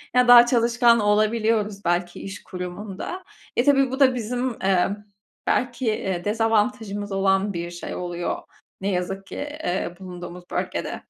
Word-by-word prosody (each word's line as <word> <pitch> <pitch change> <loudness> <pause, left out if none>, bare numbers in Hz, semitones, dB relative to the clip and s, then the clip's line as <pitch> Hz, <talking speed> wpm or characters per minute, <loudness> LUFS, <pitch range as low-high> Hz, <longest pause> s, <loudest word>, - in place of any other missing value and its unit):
Ya 250 0 +5
daha 240 0 +10
çalışkan 235 -1 +4
olabiliyoruz 210 -1 +1
belki 175 0 -1
iş 195 +1 -8
kurumunda. 195 - -6 0.3
E, 240 - +4
tabii 275 -2 +4
bu 265 - -3
da 260 -2 +5
bizim, 245 +1 -2
emm, 195 +1 +2 0.5
belki, 245 0 0
eee, 190 -4 -1
dezavantajımız 215 -1 0
olan 195 +1 +1
bir 170 0 -4
şey 175 - -6
oluyor 175 -1 -3 0.4
ne 195 - -2
yazık 190 +2 -3
ki, - - -8
eee, 285 - -3
bulunduğumuz 180 -1 -8
bölgede. - - -3
205 Hz, 140 wpm, -24 LUFS, 185-240 Hz, 0.5 s, daha